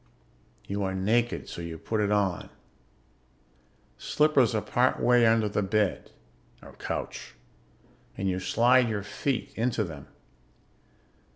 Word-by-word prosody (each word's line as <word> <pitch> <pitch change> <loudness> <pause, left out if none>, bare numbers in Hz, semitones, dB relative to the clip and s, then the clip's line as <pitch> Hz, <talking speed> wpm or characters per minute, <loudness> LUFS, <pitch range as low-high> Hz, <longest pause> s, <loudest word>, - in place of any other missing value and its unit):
You 100 +1 -3
are 95 -1 -2
naked, 115 +5 0
so - - -7
you 85 -1 -6
put 110 +5 -2
it 105 0 0
on. 100 -4 0 1.5
Slippers 140 -6 +2
are 110 - +1
part 125 +4 +1
way 120 -1 +4
under 110 -1 +3
the 105 0 -1
bed 105 0 0 0.5
(or - - -13
couch) - - -5 0.8
and 95 - -2
you 95 -1 -1
slide 120 +5 +3
your 105 -2 -2
feet 130 +5 -3
into 115 -1 0
them. 75 -7 -8
105 Hz, 125 wpm, -27 LUFS, 95-120 Hz, 1.5 s, way